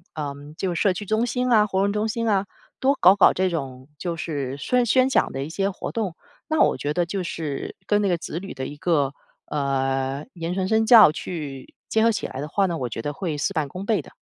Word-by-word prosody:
呃， 145 -3 -3 0.2
就 185 -2 -1
是 170 - -2
社 200 - +4
区 205 +3 -6
中 220 +3 +1
心 250 +1 -1
啊、 215 -2 +5
活 190 -1 0
动 200 +1 +2
中 210 +1 0
心 230 +1 -2
啊 200 -1 +2 0.3
多 275 +2 +3
搞 185 +2 +7
搞 200 - +6
这 185 +1 +1
种 130 -6 -5
就 175 -2 -3
是 140 -5 -3
宣 250 - +1
宣 255 +3 +4
讲 - - +2
的 135 - -3
一 145 - -6
些 195 +4 -1
活 200 - -6
动， 205 -7 -2 0.3
那 315 -1 0
我 - - +4
觉 145 - -2
得 175 +2 +1
就 190 +3 -3
是 155 -5 -4
跟 205 0 +3
那 205 - +1
个 175 - +2
子 165 0 -5
女 195 +1 -8
的 130 0 -4
一 145 - -8
个， 145 -4 +1 0.3
呃， 135 -1 -1
言 170 0 -4
传 190 -1 0
身 220 +2 +2
教 220 -8 +9
去 150 -5 -7
结 220 - +2
合 230 - +5
起 215 - -3
来 130 - -6
的 150 - -4
话 195 +5 +2
呢， 175 -3 -1
我 125 -2 -2
觉 115 - -5
得 145 - -3
会 155 -1 -3
事 175 +7 -1
半 155 -5 -1
功 185 +7 -7
倍 215 -1 +1
的。 - - -16
180 Hz, 270 characters per minute, -24 LUFS, 145-210 Hz, 0.3 s, 教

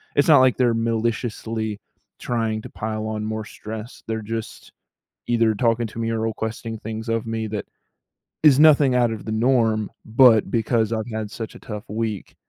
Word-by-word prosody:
it's 145 - +3
not 150 -4 +8
like 130 -1 +4
they're 120 -2 +3
maliciously 115 -1 -2 0.4
trying 115 -2 -1
to - - -9
pile 110 0 -4
on 110 -1 -3
more 110 0 -3
stress. 110 +2 -9
They're 110 0 -2
just 115 +1 -6 0.6
either 115 -2 +3
talking 115 +1 +1
to 110 - -9
me 115 0 -1
or 115 - -1
requesting 110 0 -3
things 110 +1 -6
of 115 0 -1
me 110 -1 -2
that 105 -1 -4 0.8
is 145 -3 +7
nothing 145 -4 +6
out 120 -2 +3
of 110 -2 -6
the 110 - -4
norm, 110 -2 +2
but 115 -1 +5
because 115 -1 +1
I've 110 +1 -3
had 110 -1 -3
such 115 -2 -6
a - - -11
tough 105 -2 -7
week, 110 -2 -4
115 Hz, 180 wpm, -23 LUFS, 110-115 Hz, 0.8 s, not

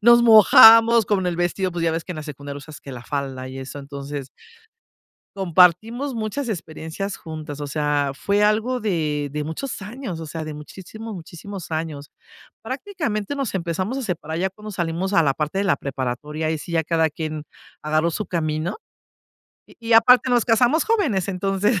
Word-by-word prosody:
nos 235 +1 +7
mojamos 225 0 +8
con 195 -3 +1
el 170 - -2
vestido, 180 +2 0
pues 170 -1 -3
ya 165 - +2
ves 165 0 -2
que - - -9
en - - -9
la 155 - -6
secundaria 145 -1 -7
usas 150 +1 -11
que 140 - -10
la 125 -2 -9
falda 135 -3 -4
y 130 +1 -8
eso. 135 +2 -7
Entonces 140 0 -7 1.1
compartimos 195 - +3
muchas 230 +4 -3
experiencias 170 0 -5
juntas, 155 -3 -8
o 145 - -3
sea, 145 -1 0
fue 200 +7 0
algo 220 +4 +2
de 155 -8 -1
de 150 +1 -3
muchos 210 - -5
años, 210 -4 -6
o 160 - -6
sea, 160 +1 -5
de 155 -1 -6
muchísimos, 195 +8 -9
muchísimos 175 +2 -9
años. 155 -3 -4 0.5
Prácticamente 260 - -3
nos 270 -7 -3
empezamos 185 +7 -2
a 270 - -3
separar 165 -6 -4
ya 190 +2 0
cuando 210 +2 -10
salimos 175 +2 -2
a 165 - +5
la 140 -3 +2
parte 155 +5 -2
de 200 - +1
la 185 - +2
preparatoria, 140 +4 -4
ahí 160 -1 -1
sí 170 - -8
ya 165 -1 +2
cada 160 0 +1
quien 155 0 -5 0.4
agarró 155 +2 +1
su 215 +6 -4
camino. 155 - -2 0.9
Y 230 -1 -2
aparte 250 +3 +6
nos 245 -2 +3
casamos 245 - +3
jóvenes, 305 - +1
entonces 195 +2 0
175 Hz, 180 wpm, -22 LUFS, 155-215 Hz, 1.1 s, mojamos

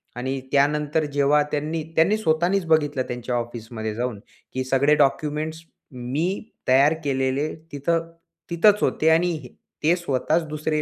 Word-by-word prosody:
आणि 130 +2 -3
त्यानंतर 150 +2 +2
जेव्हा 145 +1 +3
त्यांनी 160 +6 0
स्वतःनीच 175 0 +1
बघितलं 145 -4 +2
त्यांच्या 125 0 -3
ऑफिसमध्ये 115 -2 -4
जाऊन, 120 -3 -3 0.3
की 130 0 -1
सगळे 135 +3 +3
डॉक्युमेंट्स 150 +3 0 0.3
मी 155 - -3 0.2
तयार 135 +4 +5
केलेले 135 +1 0 0.2
तिथे 145 +4 0 0.5
तिथेच 205 +5 +4
होते 160 - +2
आणि 165 0 +3 0.5
ते 165 +3 +4
स्वतःच 160 0 0
दुसरे 155 0 -2
150 Hz, 120 wpm, -23 LUFS, 130-160 Hz, 0.5 s, तयार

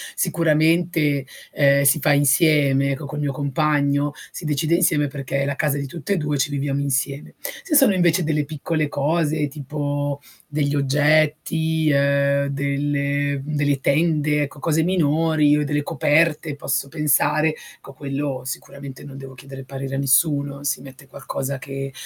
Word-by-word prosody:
sicuramente, 160 -3 +1 0.3
uhm, 140 -1 +4
si 140 +2 +4
fa 145 0 +3
insieme, 140 -1 +3
ecco, 140 +2 -4
col 145 +2 -6
mio 145 -2 -1
compagno, 145 0 0 0.2
si - - -8
decide 155 +2 +1
insieme, 165 -4 +2
perché 140 0 -4
è - - 0
la 140 0 -2
casa 150 -2 0
di 140 -1 -4
tutte 170 +7 -4
e - - 0
2 150 -2 -1
e - - -2
ci 140 - +1
viviamo 140 -1 -2
insieme. 140 0 -2 0.3
Se 345 -9 -1
sono 270 -8 +6
invece 175 -1 +2
delle 150 -2 0
piccole 155 +1 -2
cose, 150 +1 0
tipo 145 0 -4 0.3
degli 145 -1 -1
oggetti, 155 +3 +1
uhm, 140 0 +2
delle 140 0 -1
mhmm, 150 +2 -5
delle 145 -1 +1
tende 150 0 +1
ecco, 145 0 -8
cose 160 +1 +1
minori, 155 -3 +2
o 150 - 0
delle 145 0 -1
coperte, 155 0 +1
posso 140 - -2
pensare, 155 +1 +1 0.3
co - - -12
quello 140 -1 -4
sicuramente 135 +1 -8
non 140 -2 -10
devo 135 -1 -10
chiedere 135 +1 -11
parere 135 0 -6
a - - -2
nessuno. 140 +1 +1
Si 140 -3 -1
mette 135 0 -14
qualcosa 135 +1 -5
che 135 0 -6
145 Hz, 160 wpm, -21 LUFS, 140-155 Hz, 0.3 s, sono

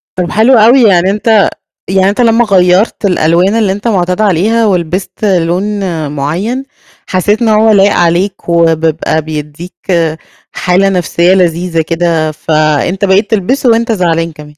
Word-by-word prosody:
طَب 180 -1 -3
حلو 225 +5 +3
أوي، 235 +3 +5
يعني 190 -3 +3
أنت 215 0 +2 0.4
يعني 190 0 +2
أنت 210 +5 -1
لمّا 230 0 +2
غيّرت 190 +2 +1
الألوان 180 +2 +1
اللي 210 -4 +1
أنت 205 +4 -4
مُعتاد 180 -1 -1
عليها 215 +4 +1
ولبِست 185 +2 -2
لون 180 -1 0 0.5
مُعيّن 180 - -3 0.4
حسّيت 205 +5 -1
إن 230 - +1
هو 215 +1 +3
لايق 200 0 +3
عليك، 175 +2 -1
وبيبقى 160 -1 0
بيدّيك 155 +3 -8 0.8
حالة 185 +2 0
نفسية 180 0 +1
لذيذة 175 -2 0
كده، 165 -1 -1
فأنت 155 +5 -1
بقيت 200 +4 +1
تلبسُه 240 +5 0
وأنت 230 0 +1
زعلان 165 -4 -1
كمان. 150 -1 -12
185 Hz, 140 wpm, -10 LUFS, 170-210 Hz, 0.8 s, أوي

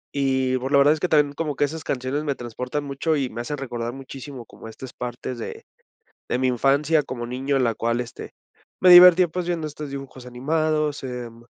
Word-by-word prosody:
Y, 130 -2 +1
pues, 130 +2 -4
la 140 - +5
verdad 145 +2 +6
es 155 - -4
que 180 - 0
también 150 -2 +3
como 150 -1 -3
que 130 - +1
esas 155 +2 -3
canciones 130 +3 -2
me 145 -2 -1
transportan 125 +4 -5
mucho 145 +3 -1
y 135 -3 -1
me 115 - -5
hacen 145 +5 -4
recordar 120 -3 -4
muchísimo 135 -1 -9
como 115 - -13
estas 120 +3 -10
partes 125 0 -6
de - - -7 0.6
de - - +1
mi 130 - +2
infancia 140 +5 +2
como 120 -2 -5
niño 130 +3 -2
en 135 - +2
la 115 -2 +1
cual, 115 +2 -1
este, 120 - -9 0.5
me 185 - +6
divertía, 180 0 +9
pues, 175 +2 -4
viendo 170 -3 -1
estos 150 -1 -7
dibujos 135 -2 -8
animados, 150 +3 -1
em 120 -2 -7
135 Hz, 210 wpm, -23 LUFS, 125-150 Hz, 0.6 s, divertía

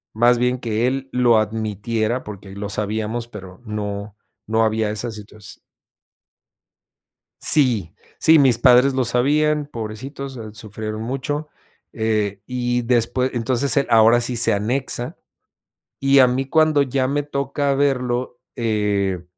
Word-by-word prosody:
más 120 +2 +4
bien 125 0 0
que 115 +1 -1
él 135 0 -3
lo 120 -3 +4
admitiera, 110 +2 -2
porque 100 -2 -10
lo 100 0 -5
sabíamos, 110 +3 -3
pero, 95 -2 -11
no 105 -1 -5 0.3
no 110 +1 +2
había 110 -1 0
esa 110 +3 -4
situas 105 -1 -11 1.8
Sí. 120 - +4 0.3
Sí, 160 -1 +5
mis 130 -4 +4
padres 125 +2 +5
lo 130 -2 0
sabían, 145 +5 +1
pobrecitos, 130 +4 -7
sufrieron 110 0 -6
mucho. 140 +5 -4 0.4
Eh, 105 -3 -1
y 125 -1 -1
después 125 +2 0
entonces, 120 +2 +1
el 140 - +2
ahora 115 +1 +5
sí 120 +1 -2
se 115 - +4
anexa, 120 +4 -2 0.8
y 135 0 +4
a 130 - +7
mí 130 +2 -1
cuando 155 -2 +3
ya 130 -1 0
me 145 +2 -1
toca 140 0 -2
verlo, 125 -3 -1 0.2
eh, 100 -5 -1
120 Hz, 130 wpm, -21 LUFS, 110-130 Hz, 1.8 s, a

